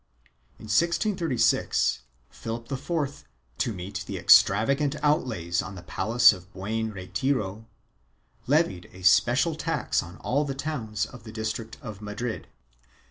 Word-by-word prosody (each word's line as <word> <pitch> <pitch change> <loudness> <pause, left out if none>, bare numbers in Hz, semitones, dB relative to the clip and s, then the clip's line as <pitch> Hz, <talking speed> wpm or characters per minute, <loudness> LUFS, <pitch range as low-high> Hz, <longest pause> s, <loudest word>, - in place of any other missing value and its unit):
3 - - -19
In - - -9
1636, 165 - +1 0.3
Philip 115 +2 -6
IV, 140 +1 -3 0.4
to 120 - +1
meet 95 -1 -6
the - - -4
extravagant 140 +8 +5
outlays 110 - +1
on 95 - -8
the 90 - -10
palace 115 +7 +4
of 90 +1 -12
Buen 110 +4 -3
Retiro, 105 +2 -2 0.8
levied 140 - +1
a 90 0 -12
special 90 - +4
tax - - -1
on 90 +1 -10
all 140 +4 0
the 140 -2 -4
towns 115 -9 -3
of 125 +1 -12
the 110 - -9
district 110 0 -4
of 110 -4 -8
Madrid. 105 +3 -5
110 Hz, 135 wpm, -26 LUFS, 100-135 Hz, 0.8 s, extravagant